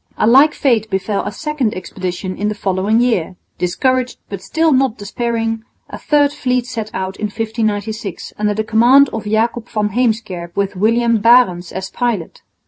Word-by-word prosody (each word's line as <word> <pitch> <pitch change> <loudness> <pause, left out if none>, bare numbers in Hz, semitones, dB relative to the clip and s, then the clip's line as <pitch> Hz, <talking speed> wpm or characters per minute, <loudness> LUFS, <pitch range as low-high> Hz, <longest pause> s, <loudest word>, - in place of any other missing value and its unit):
A - - +2
like 270 +7 +6
fate 225 -6 +1
befell 195 +1 -1
a - - -3
second 285 -1 -2
expedition 185 0 -5
in 210 - -2
the 210 - -2
following 200 +3 +1
year. 205 -8 0 0.2
Discouraged, 255 +8 0
but 200 -2 -6
still 320 - +1
not 260 -4 +2
despairing, 225 +1 -2 0.3
a - - -7
third 290 -1 +2
fleet 250 -4 -1
set 230 -4 -5
out 190 0 -4
in 215 - -3
1596 220 -2 -3
under 210 -1 0
the 220 - -1
command 245 +6 +5
of 220 -1 -5
Jacob 225 +2 0
van 210 -2 -1
Heemskerk 210 -7 -2
with 200 0 -1
William 230 +3 +2
Barendtsz 205 -6 +4
as 190 +1 -6
pilot. 235 -9 -2
220 Hz, 165 wpm, -17 LUFS, 200-245 Hz, 0.3 s, like